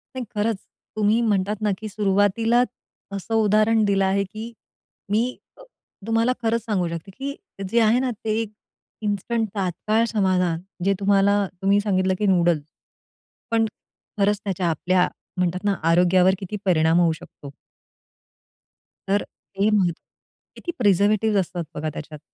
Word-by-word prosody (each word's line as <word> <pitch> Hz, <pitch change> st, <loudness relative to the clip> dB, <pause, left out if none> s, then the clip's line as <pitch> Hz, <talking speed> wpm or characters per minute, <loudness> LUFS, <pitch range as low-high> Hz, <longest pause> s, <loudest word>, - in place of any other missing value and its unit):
नाही 255 Hz, -1 st, -4 dB
खरंच, 210 Hz, 0 st, 0 dB, 0.4 s
तुम्ही 215 Hz, +2 st, +2 dB
म्हणतात 210 Hz, -1 st, 0 dB
ना 210 Hz, -, +1 dB
की 215 Hz, -, -7 dB
सुरुवातीला 205 Hz, +4 st, +2 dB, 0.5 s
असं 200 Hz, +3 st, -5 dB
उदाहरण 215 Hz, +1 st, +3 dB
दिलं 195 Hz, -1 st, +2 dB
आहे 195 Hz, +1 st, +2 dB
की 215 Hz, +4 st, -8 dB, 0.6 s
मी 215 Hz, +2 st, +3 dB, 0.3 s
अ, -, -, -15 dB, 0.5 s
तुम्हाला 225 Hz, +2 st, +2 dB
खरंच 230 Hz, +1 st, +1 dB
सांगू 195 Hz, -6 st, 0 dB
शकते 170 Hz, +3 st, -6 dB
की 280 Hz, +1 st, -4 dB, 0.3 s
जे 235 Hz, -, +3 dB
आहे 225 Hz, +3 st, +4 dB
ना, 260 Hz, -1 st, 0 dB
ते 220 Hz, 0 st, -2 dB, 0.6 s
इन्स्टंट 220 Hz, +2 st, -1 dB
तात्काळ 210 Hz, +4 st, 0 dB
समाधान 185 Hz, -5 st, +1 dB, 0.2 s
जे 195 Hz, -, +4 dB
तुम्हाला 200 Hz, 0 st, +3 dB, 0.2 s
तुम्ही 200 Hz, +1 st, +3 dB
सांगितलं 190 Hz, -2 st, +1 dB
की 210 Hz, -, +1 dB
नूडल, 175 Hz, -4 st, +3 dB, 0.9 s
पण 225 Hz, -1 st, +3 dB, 0.5 s
खरंच 205 Hz, 0 st, +2 dB
त्याच्या 185 Hz, -3 st, -1 dB
आपल्या 180 Hz, +3 st, +2 dB, 0.3 s
म्हणतात 180 Hz, 0 st, 0 dB
ना, 205 Hz, -, +2 dB
आरोग्यावर 180 Hz, +3 st, +4 dB
किती 200 Hz, +2 st, -5 dB
परिणाम 165 Hz, -2 st, +3 dB
होऊ 170 Hz, -2 st, +4 dB
शकतो. 140 Hz, -1 st, -12 dB, 1.5 s
तर 200 Hz, +1 st, +2 dB
ते 200 Hz, +2 st, -3 dB
महत्त्वाचं 195 Hz, -5 st, +3 dB, 0.7 s
आहे -, -, -11 dB
की 345 Hz, -, -1 dB
प्रिझर्वेटिव्स 210 Hz, 0 st, +3 dB
असतात 175 Hz, -2 st, -3 dB
बघा, 155 Hz, +1 st, -2 dB
त्याच्यात. 150 Hz, 0 st, -8 dB
200 Hz, 140 wpm, -23 LUFS, 185-220 Hz, 1.5 s, आहे